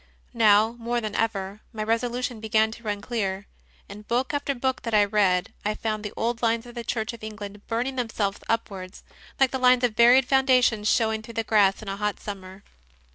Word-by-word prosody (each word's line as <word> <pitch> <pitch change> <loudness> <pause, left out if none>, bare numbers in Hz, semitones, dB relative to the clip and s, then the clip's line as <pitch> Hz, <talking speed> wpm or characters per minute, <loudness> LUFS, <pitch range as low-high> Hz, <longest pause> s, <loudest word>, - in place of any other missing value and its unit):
Now, 220 -1 +5
more 240 +1 -1
than 215 -3 -4
ever, 205 -2 -2
my 215 -2 -4
resolution 240 +1 -1
began 220 0 +2
to 235 - -10
run 205 -3 -3
clear. 200 -4 -3 0.4
In 205 +1 -10
book 245 +6 -1
after 285 -1 -1
book 260 +1 -1
that 230 -2 -2
I 205 -1 +5
read 195 -3 +1
I 210 +1 -1
found 215 -2 -3
the 210 - -5
old 235 +1 -1
lines 230 0 +1
of 240 - -11
the 235 -1 -6
Church 225 0 -2
of 230 - -12
England 210 -2 -8
burning 245 +4 -2
themselves 215 -4 -2
upwards, 200 -4 -3 0.4
like 270 -2 +4
the 265 - -2
lines 250 0 +4
of 240 -3 +1
buried 245 +3 +6
founda 265 -2 +4
tions 215 -3 +1
showing 220 -1 +1
through 230 +1 -11
the 225 - 0
grass 205 -2 +3
in - - -11
a 195 0 -3
hot 210 0 -2
summer. 190 -1 -8
220 Hz, 205 wpm, -25 LUFS, 210-240 Hz, 0.4 s, buried